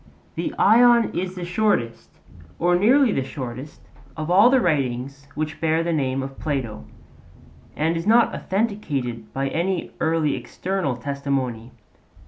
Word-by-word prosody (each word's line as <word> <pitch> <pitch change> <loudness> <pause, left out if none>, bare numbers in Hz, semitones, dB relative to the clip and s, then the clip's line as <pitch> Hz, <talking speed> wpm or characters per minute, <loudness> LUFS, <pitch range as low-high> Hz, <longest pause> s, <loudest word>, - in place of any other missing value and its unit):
The - - -3
Ion 235 0 +5
is 185 +1 -3
the 180 -1 -5
shortest, 180 - -1 0.5
or 175 +1 +2
nearly 240 +7 +4
the 135 - 0
shortest, 130 +1 -7 0.4
of 155 +2 -3
all 200 +6 +7
the 265 0 +4
writings 140 - -1
which 155 0 -4
bear 160 0 +1
the 170 0 -1
name 135 -3 -1
of 135 0 -8
Plato, 125 - -3 0.9
and 160 +2 0
is 165 +3 -3
not 230 +2 +4
authenticated 145 - -3
by 135 0 -2
any 175 +4 -2
early 160 -2 +1
external 185 -8 -3
testimony. 135 -3 -3
155 Hz, 135 wpm, -23 LUFS, 135-190 Hz, 0.9 s, all